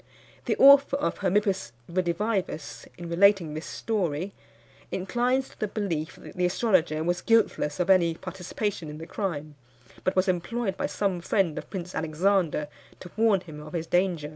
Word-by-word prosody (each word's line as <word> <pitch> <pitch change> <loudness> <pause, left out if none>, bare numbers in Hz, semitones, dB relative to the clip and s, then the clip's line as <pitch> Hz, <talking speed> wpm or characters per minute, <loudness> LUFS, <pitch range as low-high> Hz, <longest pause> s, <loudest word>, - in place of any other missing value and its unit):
The - - +1
author 280 0 +7
of 285 - -2
Hermippus 195 - 0
Redivivus, 180 -2 -2
in 175 - -7
relating 175 -2 +4
this 155 +2 -6
story, 185 -4 -2 0.6
inclines 245 +7 0
to - - -20
the 215 - 0
belief 185 -6 -3
that - - -12
the 180 -1 +1
astrologer 180 -6 +1
was 175 +1 0
guiltless 225 -10 +2
of 180 - +1
any 170 -3 +4
participation 185 -1 -4
in 150 - -7
the 160 - -8
crime, 160 -7 -4 0.5
but 185 - 0
was 185 +1 +2
employed 190 +3 -1
by - - -2
some 195 -4 -1
friend 180 -3 +1
of - - -11
Prince 180 -2 -6
Alexander 160 -1 +1 0.3
to 180 - -11
warn 215 -3 +3
him 155 -4 -10
of 150 0 -11
his 165 -2 -2
danger. 175 -4 0
180 Hz, 165 wpm, -27 LUFS, 165-205 Hz, 0.6 s, author